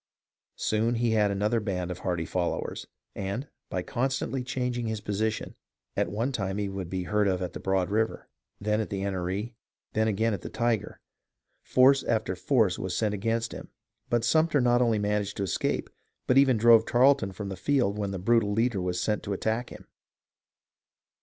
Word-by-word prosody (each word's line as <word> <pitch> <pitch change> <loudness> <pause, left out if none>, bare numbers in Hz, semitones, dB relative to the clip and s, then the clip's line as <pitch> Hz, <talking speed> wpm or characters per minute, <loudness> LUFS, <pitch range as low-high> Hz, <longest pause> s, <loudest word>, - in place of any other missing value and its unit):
Soon 110 +2 +1
he 115 0 +1
had 105 -2 +3
another 105 +4 +1
band 90 -4 -3
of 90 - -6
hardy 85 -3 -2
followers, 90 +1 -2 0.3
and, 100 +8 -4 0.2
by 90 - -2
con 130 +7 -1
stantly 130 0 -2
changing 125 -1 -2
his 110 -1 -2
position, 105 +2 -2 0.4
at - - 0
one 115 +7 -1
time 100 -5 -2
he 105 -1 -1
would 95 -3 -5
be 95 0 -2
heard 105 +2 +1
of 95 -2 +1
at 90 -2 -4
the - - -6
Broad 95 -1 0
River, 110 +1 -1 0.3
then 105 +1 0
at 110 - -4
the 100 -1 -3
Enoree, 95 0 -2
and 120 +3 -7 0.4
then 110 +1 +2
again 110 +1 +1
at 95 - -4
the - - -6
Tyger. 115 -3 -1 0.7
Force 135 +1 +5
after 110 -5 -1
force 95 0 +2
was 90 -1 -3
sent 105 -2 +1
against 115 +3 -1
him, - - -8 0.4
but 120 -1 +1
Sumter 155 +3 +3
not 120 -1 +3
only 115 -3 +3
managed 105 -1 -1
to 100 - -1
escape, 95 - -1 0.4
but 125 - +2
even 135 -3 +5
drove 115 0 +7
Tarleton 130 -4 +4
from 100 +1 -6
the 95 - -4
field 115 -3 +1
when 100 -1 -1
that 95 -1 -6
brutal 115 -3 +3
leader 110 -1 +1
was 90 0 -1
sent 105 +3 0
to 100 - -3
attack 110 +5 -1
him. - - -11
105 Hz, 190 wpm, -28 LUFS, 95-120 Hz, 0.7 s, drove